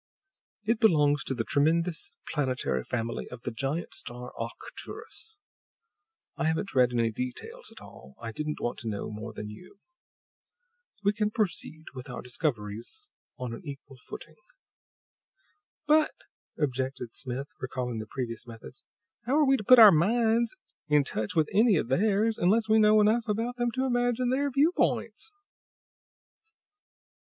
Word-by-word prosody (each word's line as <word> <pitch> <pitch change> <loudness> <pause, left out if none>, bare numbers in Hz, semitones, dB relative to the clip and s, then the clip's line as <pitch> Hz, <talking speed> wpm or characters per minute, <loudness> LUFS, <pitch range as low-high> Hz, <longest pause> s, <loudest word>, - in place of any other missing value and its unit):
It 220 +2 +1
belongs 150 -8 +4
to 135 - -2
the 115 - -1
tremendous 165 +6 +1
planetary 130 - -1
family 115 - -3
of 125 -1 -10
the - - -3
giant 140 +8 -3
star 125 -6 -7
Arcturus. 435 - -8 1.0
I - - -1
haven't 160 +5 -1
read 125 -1 +4
any 115 -2 +1
details 125 +2 -6
at - - -12
all; 65 +2 -14
I 115 -1 -5
didn't 150 +6 -4
want 120 - -3
to 115 - -6
know 105 0 -3
more 110 +2 -6
than 105 -1 -7
you. 180 - -13 1.3
We 205 +1 +3
can 210 0 0
proceed 180 -7 -2
with 130 +1 -8
our 125 - -6
discoveries 120 - -3 0.3
on 125 -3 -4
an - - -7
equal 140 -3 -10
footing." - - -9 1.5
"But," 305 0 +4 0.4
objected 130 -4 -2
Smith, 130 +2 -4
recalling 125 -3 -3
the 110 - -6
previous 120 -1 -5
methods, 115 +3 -11 0.4
"how 265 - +2
are 305 - +5
we 270 0 +5
to 215 - -5
put 255 +5 +8
our 220 -3 +11
minds 225 - +2 0.3
in 150 -1 +4
touch 110 -5 -3
with 160 -2 +3
any 215 +1 +5
of 150 - 0
theirs, 210 +8 +2
unless 215 +6 +3
we 220 0 +5
know 215 0 +6
enough 225 +2 +3
about 230 +4 -1
them 240 0 +1
to 260 0 0
imagine 245 0 +1
their 280 +2 +1
viewpoints?" 315 - +1
155 Hz, 145 wpm, -28 LUFS, -, 1.5 s, our